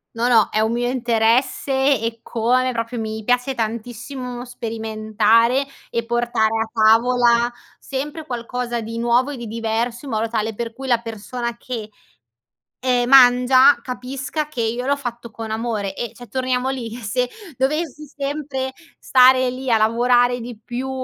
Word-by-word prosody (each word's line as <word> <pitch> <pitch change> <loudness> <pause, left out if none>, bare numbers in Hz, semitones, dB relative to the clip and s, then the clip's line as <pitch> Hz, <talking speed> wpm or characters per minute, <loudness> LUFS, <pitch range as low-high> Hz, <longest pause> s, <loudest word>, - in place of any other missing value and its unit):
No, 235 +1 +1
no, 230 -4 +4
è 215 - 0
un 220 +1 +1
mio 245 0 0
interesse 240 +2 +1 0.3
eccome, 235 +2 0
proprio 230 +1 -3
mi 220 0 -4
piace 250 +3 +1
tantissimo 245 +2 -5
sperimentare 225 +1 +1 0.2
e 235 0 -2
portare 235 -2 +1
a 220 - -11
tavola 235 +2 +4 0.3
sempre 295 +4 -5
qualcosa 240 -2 -3
di 230 +1 -5
nuovo 240 +3 +2
e 275 - -6
di 235 -1 -7
diverso 230 +2 -2
in 275 - -7
modo 220 +1 0
tale 220 -1 -2
per 230 +1 -5
cui 265 +2 -8
la 240 -2 +3
persona 235 +1 -5
che, 235 -3 -6 0.9
ehm, 250 -1 +1
mangia 255 +1 +7
capisca 265 +4 -4
che 255 -6 -6
io 240 +3 -2
l'ho 285 - +2
fatto 240 -3 -6
con 220 0 -7
amore 220 -3 -2
e 240 - -5
cioè, 245 -1 -12
torniamo 255 0 -1
lì: 235 -4 -5
eh, 245 - -10
se 245 +4 -1 0.3
dovessi 300 +2 -1
sempre 275 -2 -4 0.3
stare 255 0 +5
lì 255 +1 -5
a 230 - +5
lavorare 245 +2 +3
di 235 -1 -8
più, 250 +3 -4
240 Hz, 155 wpm, -21 LUFS, 230-255 Hz, 0.9 s, mangia